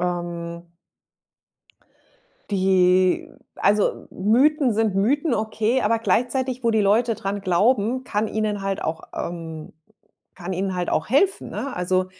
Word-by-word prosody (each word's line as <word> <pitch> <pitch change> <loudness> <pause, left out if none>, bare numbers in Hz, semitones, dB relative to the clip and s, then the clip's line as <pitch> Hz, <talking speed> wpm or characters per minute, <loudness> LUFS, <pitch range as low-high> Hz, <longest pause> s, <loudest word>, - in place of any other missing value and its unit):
ähm 175 -1 -4 1.9
die 185 -1 +3 0.3
Also, 205 +1 +1
Mythen 260 - +2
sind 220 -2 +1
Mythen, 260 - +1
okay, 220 +3 0
aber 225 +2 +2
gleichzeitig 250 +4 0
wo 230 - +2
die 220 -1 +2
Leute 225 +4 +2
dran 200 0 -4
glauben, 220 +6 +1
kann 215 -2 -1
ihnen 210 -2 -2
halt 195 0 -2
auch, 160 0 -3
ähm 165 -2 -6 0.6
kann 180 0 -5
ihnen 190 +1 -2
halt 175 -1 -2
auch 160 - -1
helfen, 380 - +1
ne? 275 - -5
Also, 185 +1 0
205 Hz, 130 wpm, -23 LUFS, 180-235 Hz, 1.9 s, die